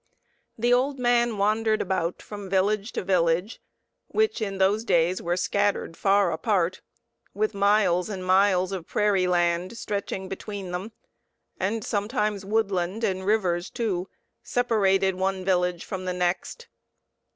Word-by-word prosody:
The 240 +2 +2
old 270 +3 +2
man 240 -2 +2
wandered 215 +2 +2
about 180 -2 -2
from 205 -2 -8
village 200 +3 +1
to - - -3
village, 180 +2 +1 0.5
which 435 - 0
in 195 -2 -2
those 195 +3 +2
days 180 -3 +2
were 175 +1 -1
scattered 200 -2 0
far 195 -1 +3
apart, 185 +1 0 0.5
with 215 +1 0
miles 200 -2 +2
and 190 -3 -5
miles 185 0 +3
of 185 -4 -5
prairie 200 -3 +2
land 175 +3 0
stretching 200 -3 -4
between 195 -1 -6
them, 185 +5 -4 0.7
and 210 +3 -1
sometimes 210 -2 -1
woodland 200 -1 -1
and 190 -1 -1
rivers, 185 -4 +1
too, 195 -6 -2 0.3
separated 195 -6 +2
one 190 0 -2
village 180 -2 +1
from 185 -1 -5
the 180 - -1
next. 180 - -2
195 Hz, 135 wpm, -25 LUFS, 185-215 Hz, 0.7 s, far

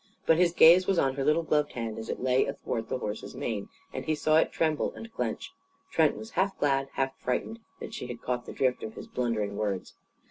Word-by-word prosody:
But 160 - +5
his 175 -1 +4
gaze 175 +2 +7
was 195 - +2
on 135 -4 +2
her 135 0 -2
little 155 +4 +3
gloved 150 -2 +1
hand 115 -2 -4
as 110 - -7
it - - -3
lay 130 0 +2
athwart 120 -4 -4
the - - -1
horse's 105 -3 -5
mane. 105 -4 -3 0.2
And 130 - -4
he 155 - +1
saw 155 +1 +3
it - - +3
tremble 155 -2 0
and 225 0 -10
clench. - - -3 0.4
Trent 160 -3 +3
was 220 +1 -8
half 195 +1 0
glad, 135 -1 +1
half 135 0 -1
frightened 175 - -2 0.2
that - - -7
she 125 - -5
had 120 -1 -6
caught 125 -1 -2
the - - -5
drift 130 -1 0
of 110 - -6
his - - -8
blundering 110 -5 -2
words. 100 -3 -2
135 Hz, 225 wpm, -29 LUFS, 120-160 Hz, 0.4 s, gaze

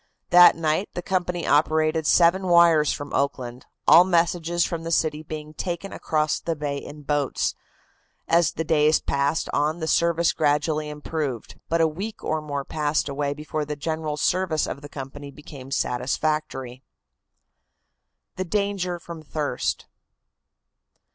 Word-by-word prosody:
That 175 0 +8
night 160 +4 0
the 175 - -4
company 180 -2 -1
operated 155 +1 +2
seven 185 +2 +4
wires 170 -3 +5
from 145 - -6
Oakland, 130 -3 -2 0.2
all 175 - +9
messages 170 -1 +1
from 170 -1 -4
the 165 - -4
city 155 -2 +1
being 155 0 -8
taken 175 +4 -4
across 155 -1 0
the 165 - -3
bay 145 -2 -3
in 150 +1 -10
boats. 145 -1 0 0.7
As 170 -2 +3
the 160 - -2
days 155 -1 +3
passed 140 +3 0
on 150 +3 0
the 160 - -3
service 170 +1 +2
gradually 150 0 0
improved, 150 -4 -5
but 165 0 +2
a 165 - +5
week 195 +8 -6
or 155 0 -1
more 145 -2 -4
passed 150 -1 -1
away 140 0 -2
before 155 +1 -4
the 150 0 -4
general 155 0 -3
service 170 -1 +1
of 140 - -6
the 145 - -10
company 140 +1 -8
became 140 -2 -11
satisfactory. 135 0 -2 1.6
THE 185 - -2
DANGER 195 -2 -1
FROM 170 -1 -9
THIRST. 150 -4 -3
155 Hz, 140 wpm, -24 LUFS, 145-170 Hz, 1.6 s, all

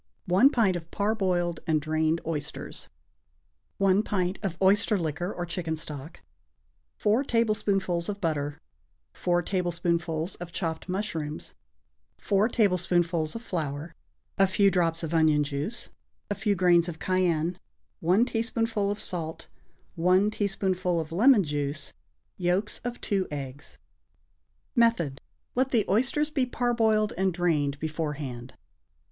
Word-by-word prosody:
1 190 +10 +6
pint 220 -9 +2
of 170 -1 -6
parboiled 185 -5 0
and 155 -1 +3
drained 155 +2 0
oysters. 150 -3 -4 0.9
1 195 0 +4
pint 185 -3 -1
of 190 -5 -3
oyster 205 +3 +4
liquor 175 +2 -2
or 175 - -4
chicken 165 -2 -3
stock. 150 0 -7 0.8
4 215 +6 +2
tablespoonfuls 205 -8 0
of 205 -1 -3
butter. 150 -5 -2 0.5
4 175 -1 +1
tablespoonfuls 170 -2 -1
of 175 -1 -8
chopped 165 0 -3
mushrooms. 165 -6 -3 0.6
4 205 +2 +2
tablespoonfuls 175 -6 +1
of 230 - -6
flour. 155 -4 -4 0.5
A 195 - +6
few 195 +1 +3
drops 170 -2 +1
of 165 0 -3
onion 155 -2 +4
juice. 145 +10 -4 0.4
A - - +3
few 205 0 0
grains 175 -1 +4
of 165 - -6
cayenne. 180 -2 0 0.4
1 185 +8 +3
teaspoonful 225 -3 -1
of 205 +1 -2
salt. 165 -3 -4 0.5
1 185 +4 +3
teaspoonful 190 -4 0
of 160 0 -5
lemon 220 +4 +5
juice. 145 -1 -3 0.4
Yolks 185 +4 0
of 245 0 -4
2 195 -2 0
eggs. 140 -1 -7 1.0
Method. 200 - +2 0.3
Let 260 +1 +1
the 230 -5 +2
oysters 265 +8 +1
be 265 -4 +1
parboiled 225 -4 +1
and 190 0 +2
drained 155 -5 0
beforehand. 150 -6 -4
180 Hz, 125 wpm, -27 LUFS, 160-205 Hz, 1.0 s, 1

